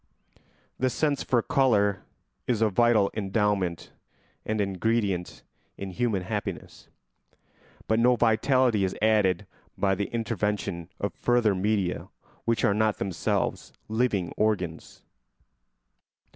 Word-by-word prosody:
The 130 - +2
sense 145 +2 0
for 120 -3 +1
colour 105 -7 +2 0.5
is 115 -3 +1
a 110 - +3
vital 110 -1 +3
endowment 100 -4 -1 0.6
and 110 0 -1
an 100 -1 +1
ingredient 100 -2 -1 0.3
in 100 -1 -6
human 100 -1 -1
happiness; 100 -3 -5 1.0
but 110 +1 +2
no 125 +1 +5
vitality 120 -1 +3
is 95 - -1
added 105 -3 +2 0.3
by 95 -1 +2
the 100 +1 -1
intervention 105 -6 -2
of - - -2
further 120 -4 +2
media 95 -1 -1 0.4
which 115 -1 +1
are 100 - +3
not 110 0 +1
themselves 95 -4 -2 0.2
living 110 -6 0
organs. 95 -7 -2
105 Hz, 115 wpm, -27 LUFS, 95-115 Hz, 1.0 s, no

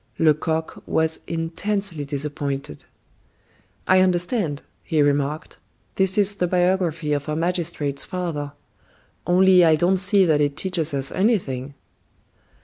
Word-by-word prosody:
Lecoq 160 +1 0
was 160 0 0
intensely 165 +1 -3
disappointed. 140 - -4 1.0
"I 185 0 +5
understand," 180 - 0 0.2
he 160 -3 -2
remarked. 145 +1 0 0.3
"This 190 0 +1
is 205 0 +4
the 180 -3 -1
biography 175 -4 0
of 145 +1 -3
our 150 - -1
magistrate's 165 -4 -1
father. 165 -6 -4 0.7
Only 185 0 +5
I 160 -2 +5
don't 175 +4 +2
see 195 +1 +3
that 155 -3 +2
it 145 0 0
teaches 165 -4 -1
us 135 0 -2
anything." 145 - -1
165 Hz, 120 wpm, -22 LUFS, 145-185 Hz, 1.0 s, I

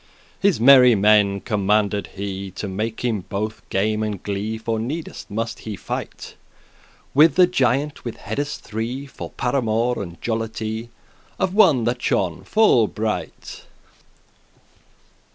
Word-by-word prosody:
His 195 - +2
merry 125 -1 +7
men 100 -1 +3
commanded 105 -1 0
he 100 0 -5
To 105 - -4
make 110 +5 -3
him 110 -6 -1
both 105 +2 -3
game 105 +2 0
and 105 -3 -3
glee; 105 +2 -3
For 110 0 -2
needes 150 +9 -5
must 115 +2 -3
he 110 -2 -6
fight - - -6 0.8
With 155 +5 +5
a 180 - +8
giant 140 -3 0
with 120 - -6
heades 145 +8 -4
three, 115 +5 -5
For 135 - -8
paramour 120 -1 0
and 85 -4 -8
jollity 110 0 -3 0.5
Of 190 -1 -1
one 175 - +5
that 120 +2 -1
shone 85 -4 0
full 170 - +4
bright. 110 +1 -5
110 Hz, 130 wpm, -22 LUFS, 105-125 Hz, 0.8 s, a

